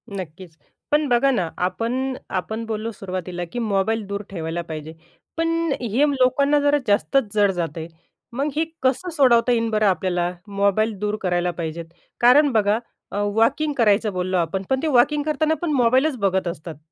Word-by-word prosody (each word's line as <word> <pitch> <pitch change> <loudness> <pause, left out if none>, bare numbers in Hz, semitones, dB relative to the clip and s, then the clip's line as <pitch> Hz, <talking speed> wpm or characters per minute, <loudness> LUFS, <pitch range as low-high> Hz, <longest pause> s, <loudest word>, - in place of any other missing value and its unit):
नक्कीच. 175 -2 -8 0.4
पण 295 0 +3
बघा 245 +3 +3
ना, 180 -9 0
आपण 245 +8 -1 0.2
आपण 220 +5 -5
बोललो 220 0 -3
सुरुवातीला, 185 -3 -5
की 245 - -4
मोबाईल 215 0 0
दूर 200 0 -4
ठेवायला 170 -2 -4
पाहिजे, 160 -1 -7 0.4
पण 330 0 +1 0.3
हे 240 +5 +2
लोकांना 280 +3 +3
जरा 290 0 +3
जास्तच 210 +2 +1
जड 205 -2 +3
जात 170 -4 -4
आहे. 160 0 -5 0.5
मग 280 +4 -1
हे 320 - +1 0.2
कसं 265 +8 +1
सोडवता 245 -3 +4
येईन 230 -1 +1
बरं 215 -1 +1
आपल्याला? 180 -1 0 0.2
मोबाईल 200 +2 +1
दूर 210 0 -1
करायला 175 -1 0
पाहिजे 165 +1 -4 0.4
कारण 275 +4 +6
बघा 215 -1 +2 0.3
अ, - - -6 0.2
वॉकिंग 290 +7 +2
करायचं 215 -3 +2
बोललो 185 0 -1
आपण. 175 +3 -1
पण 265 - +1
ते - - +1
वॉकिंग 290 +2 +3
करताना 310 +1 +1
पण 335 -3 -1
मोबाईलच 260 +4 +3
बघत 190 -2 +1
असतात. 165 -1 -6
215 Hz, 165 wpm, -22 LUFS, 185-260 Hz, 0.5 s, कारण